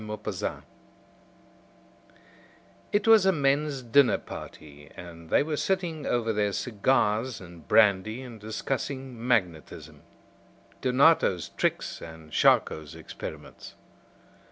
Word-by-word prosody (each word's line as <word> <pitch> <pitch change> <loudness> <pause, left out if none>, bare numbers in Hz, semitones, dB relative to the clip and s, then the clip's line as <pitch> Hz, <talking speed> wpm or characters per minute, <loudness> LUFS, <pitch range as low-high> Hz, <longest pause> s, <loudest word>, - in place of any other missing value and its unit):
MAGNETISM 105 0 -5 2.3
It 205 +1 +1
was 220 -4 +6
a - - +6
men's 140 -3 0
dinner 125 +3 +4
party, 75 -1 -11
and 85 -2 -11
they - - +3
were 155 +1 -3
sitting 175 -5 -2
over 115 -2 0
their 105 -1 0
cigars 115 +1 0
and 85 -3 -13
brandy 110 +3 +3
and 120 -3 -10
discussing 130 +2 -4
magnetism. 90 -10 -2 0.8
Donato's 130 - +3
tricks - - -2
and 80 -1 -11
Charcot's 75 -1 +2
experiments. 75 -2 -10
115 Hz, 100 wpm, -27 LUFS, 90-140 Hz, 2.3 s, was